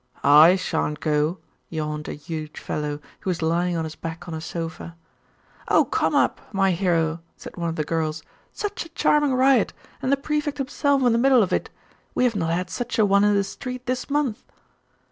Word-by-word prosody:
'I 155 +5 +8
shan't 160 -5 -2
go,' 155 +3 +1 0.3
yawned 150 -1 -4
a - - -4
huge 155 0 -7
fellow, 150 -1 -3 0.2
who - - -4
was 170 -3 -1
lying 170 +2 +1
on 165 - -1
his 160 -1 -5
back 165 +2 -7
on 170 - -5
a 160 - -4
sofa. 165 0 -6 0.7
'Oh - - +4
come - - 0
up, - - +2
my 195 -1 +2
hero,' 165 -2 +1 0.2
said - - -10
one 170 -1 -2
of 165 - -4
the 155 - -1
girls. 155 0 -2 0.3
'Such 410 -4 -4
a - - -12
charming 295 -3 +2
riot, 260 -3 +4 0.3
and 260 - 0
the 280 - +4
Prefect 295 +1 -2
himself 280 0 +1
in 245 - +4
the 230 - +2
middle 260 -2 +5
of 185 - -2
it! - - -1 0.5
We - - +2
have 245 -3 +2
not 165 -5 -1
had 180 +2 -1
such 245 0 -3
a 215 - +5
one 200 0 +4
in 205 0 +4
the 200 - +3
street 250 +5 -7
this 255 +1 -2
month. 280 -6 0
180 Hz, 205 wpm, -24 LUFS, 160-250 Hz, 0.7 s, I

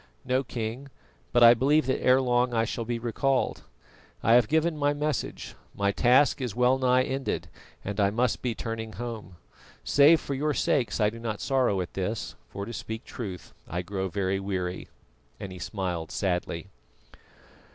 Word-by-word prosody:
"No, 130 +1 +1
King, 120 +2 -5 0.4
but 120 -1 +5
I 115 0 +10
believe 140 +6 +3
that 130 - 0
ere 130 +1 +5
long 125 -1 +1
I 115 0 +2
shall 115 0 -4
be 120 +1 -2
recalled. 130 +3 0 0.6
I 115 - +4
have 120 -2 +6
given 160 +3 +1
my 145 -1 +1
message, 150 -1 -3 0.2
my 100 0 +1
task 130 +6 +4
is 125 -6 -3
well 125 +2 +3
nigh 130 0 +3
ended 135 +1 -3 0.4
and 100 +1 -3
I 100 -1 +4
must 120 +1 0
be 120 -3 -2
turning 110 -1 -5
home. 115 -6 -7 0.5
Save 150 +3 +6
for 140 - -5
your 150 +2 0
sakes 120 -6 +1
I 105 -1 +3
do 115 - -10
not 110 -3 -4
sorrow 125 -8 +1
at 90 - -6
this, 100 +3 -3 0.2
for 100 0 -5
to 115 - -7
speak 110 +1 -6
truth 95 -7 -7 0.2
I 90 +2 -3
grow 95 +1 -3
very 95 0 -1
weary," 95 -2 -3 0.5
and 95 - -6
he 90 - -9
smiled 90 -4 -3
sadly. 90 -1 -2
115 Hz, 170 wpm, -27 LUFS, 100-130 Hz, 0.6 s, I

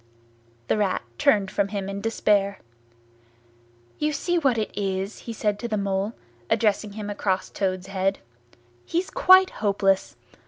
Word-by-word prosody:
The - - +1
Rat 195 -9 0 0.2
turned 200 -3 +3
from 200 -1 +1
him 200 -1 -4
in 200 0 -4
despair. 205 -2 +1 1.4
"You 300 0 0
see 350 +4 0
what 270 -6 +2
it 215 -2 -2
is?" 195 0 -2
he - - -1
said 210 -2 -1
to 235 - -3
the 215 -2 -1
Mole, 200 +2 -1 0.4
addressing 210 -2 +1
him 210 -1 -6
across 200 -2 -1
Toad's 185 -2 -2
head: 195 0 -1 0.7
"He's 350 - -2
quite 375 -6 +6
hopeless. 195 -2 +1
205 Hz, 145 wpm, -25 LUFS, 195-220 Hz, 1.4 s, quite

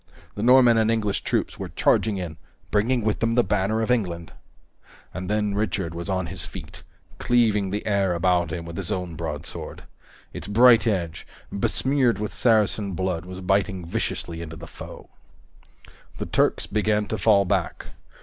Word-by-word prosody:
The 105 - -6
Norman 125 -1 +6
and 110 0 +2
English 110 -3 0
troops - - -1
were - - -5
charging 105 -2 +2
in, 85 -4 -5 0.3
bringing 115 +3 +1
with 110 - 0
them 115 0 +1
the 120 - +4
banner 105 +2 0
of 110 - 0
England! 90 -8 -1 0.8
And 90 +1 -5
then 105 -1 0
Richard 100 -4 -1
was 85 +3 -6
on 95 -1 0
his - - -6
feet, - - -9 0.4
cleaving 110 -5 +2
the 105 +2 -3
air 100 -4 +1
about 85 -1 +2
him 85 0 -4
with 85 0 -8
his 95 -4 -4
own 90 -3 -3
broadsword. - - -6 0.5
Its - - -6
bright 115 +2 +6
edge, 85 -7 -2 0.2
besmeared 130 +3 +1
with 105 0 -4
Saracen 105 -3 +2
blood, 90 -1 -2
was 95 +1 -8
biting 95 -1 0
viciously 85 0 -3
into 80 -1 -7
the 85 +1 -9
foe. - - -11 1.1
The - - -4
Turks - - +1
began 105 0 0
to 110 - -2
fall 100 -3 +4
back. - - -2
100 Hz, 165 wpm, -24 LUFS, 90-110 Hz, 1.1 s, Norman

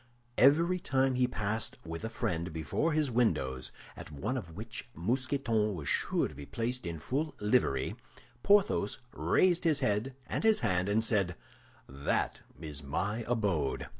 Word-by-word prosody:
Every 165 +7 +5
time 135 -4 +2
he 125 0 +2
passed 110 0 -2
with 80 +2 -6
a 110 - -2
friend 85 -6 -2
before 80 - -1
his 150 -4 +1
windows, 65 - +1 0.2
at - - -9
one 75 - -3
of 85 -11 -6
which 110 +4 -7
Mousqueton 115 - 0
was 75 -4 -6
sure - - +1
to - - -12
be 70 0 -9
placed 120 -2 -2
in 85 -1 -4
full 145 - -2
livery, 105 - +1 0.5
Porthos 195 - +3 0.2
raised 180 -2 +3
his 155 -4 +2
head 115 +2 0
and - - -3
his 220 -1 +4
hand, 90 0 +1
and 110 +2 +3
said, 100 -6 +1 0.5
"That 70 +1 -1 0.2
is 75 -3 -5
my 100 +11 -2
abode!" 100 - 0
110 Hz, 155 wpm, -31 LUFS, 85-130 Hz, 0.5 s, Every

